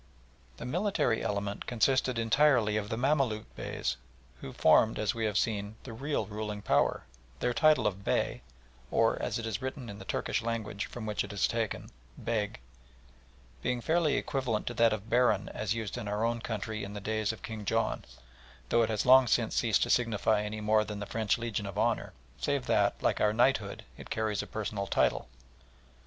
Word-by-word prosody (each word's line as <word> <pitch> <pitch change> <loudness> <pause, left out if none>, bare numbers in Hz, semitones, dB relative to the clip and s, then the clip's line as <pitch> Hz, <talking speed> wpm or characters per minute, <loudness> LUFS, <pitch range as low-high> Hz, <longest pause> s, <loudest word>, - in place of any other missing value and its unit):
The - - -7
military 170 - +1
element 100 0 -3
consisted 130 +1 +2
entirely 115 -1 +3
of 105 -1 -2
the 115 - -2
Mamaluk 130 -5 +1
Beys, - - -3 0.4
who 65 - -7
formed, 110 - +4
as 105 -2 0
we 115 -1 -2
have 105 -1 0
seen, 105 -1 -1
the 120 - -8
real 140 0 -2
ruling 105 0 -5
power, - - +2 0.4
their 125 - 0
title 155 +4 +4
of 100 0 -1
Bey - - 0 0.5
or, - - +2
as 105 - -1
it 115 - -4
is 110 -2 -3
written 130 -2 -5
in 100 - -10
the - - -8
Turkish - - -1
language 110 -3 -3
from 120 -3 -7
which 105 -1 -1
it - - -7
is 100 - +1
taken, 115 -2 -3 0.3
Beg 105 - -2 1.0
being 125 - 0
fairly 160 +3 +2
equivalent 125 -6 -1
to - - -3
that 115 -1 +4
of 110 0 -3
Baron 115 -4 +2
as 110 +1 -2
used 110 -3 -4
in 105 - -5
our 105 +2 -1
own 115 0 -1
country 110 -1 -4
in 100 +1 -7
the - - -4
days 110 +1 -1
of 110 - -11
King 110 -2 -6
John, 100 - 0 0.7
though 120 - +4
it 115 - +2
has 110 -2 -1
long 130 0 +7
since 115 0 +1
ceased 115 -5 +3
to - - 0
signify 110 -3 +2
any 105 0 -4
more 110 0 +3
than 105 -1 -6
the 105 - -4
French 110 0 0
Legion 115 -3 -3
of 100 0 -7
Honour, 115 +1 +1 0.3
save 140 -3 -1
that, - - +2
like - - +1
our 105 0 +3
Knighthood, 115 -3 +1
it - - -11
carries 110 -2 -1
a - - -8
personal 105 -2 -3
title. - - +1
110 Hz, 190 wpm, -30 LUFS, 105-120 Hz, 1.0 s, long